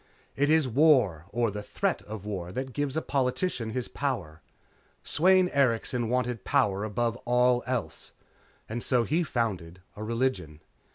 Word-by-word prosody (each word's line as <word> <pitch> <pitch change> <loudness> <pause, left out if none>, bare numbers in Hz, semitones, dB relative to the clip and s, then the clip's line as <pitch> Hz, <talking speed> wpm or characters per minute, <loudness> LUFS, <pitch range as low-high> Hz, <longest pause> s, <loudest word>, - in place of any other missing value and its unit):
It 145 +2 +2
is 155 -3 +4
war 125 - +3
or 115 0 0
the 105 +1 -5
threat 105 - -2
of 105 -2 -7
war 90 -4 -4
that 130 0 -4
gives 145 +2 -2
a 160 - -1
politician 130 -2 -1
his 125 +2 -3
power. 95 - -3 0.6
Sweyn 185 +3 +4
Erikson 120 -4 +1
wanted 125 -3 -1
power 100 0 +1
above 115 +2 -1
all 125 0 +2
else. 125 -4 -3 0.6
And 115 +2 -4
so 125 -3 +2
he 160 +9 +1
founded 100 - -2 0.2
a 105 - -6
religion. 115 - -2
120 Hz, 150 wpm, -28 LUFS, 105-135 Hz, 0.6 s, is